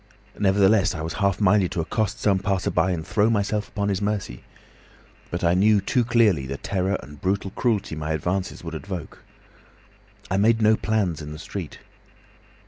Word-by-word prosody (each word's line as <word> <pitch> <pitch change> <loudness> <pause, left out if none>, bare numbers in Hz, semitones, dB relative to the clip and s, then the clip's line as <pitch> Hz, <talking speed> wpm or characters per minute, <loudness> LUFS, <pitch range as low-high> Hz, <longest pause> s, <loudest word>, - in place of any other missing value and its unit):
Nevertheless, 100 -1 +3
I 80 - -4
was 80 - -4
half 100 -2 +2
minded 100 -2 +3
to - - -2
accost 105 +6 -1
some 100 -2 +2
passer 95 -1 -1
by 95 - +2
and 85 -4 -2
throw 105 +1 +2
myself 105 -1 0
upon 100 -1 -2
his 95 -1 -1
mercy. 100 - -3 0.9
But 85 - -4
I 85 0 +4
knew 105 +3 +4
too 125 +6 +1
clearly 110 - +2
the 70 +1 -4
terror 95 +3 -1
and 75 -1 -13
brutal 95 0 -1
cruelty 110 -9 -1
my 75 0 -4
advances 90 +5 -2
would - - -6
evoke. 95 -5 -7 1.1
I 95 - +2
made 110 +3 +3
no 110 0 +5
plans 100 -8 -1
in 75 0 -7
the - - -8
street. - - -7
95 Hz, 175 wpm, -24 LUFS, 90-105 Hz, 1.1 s, no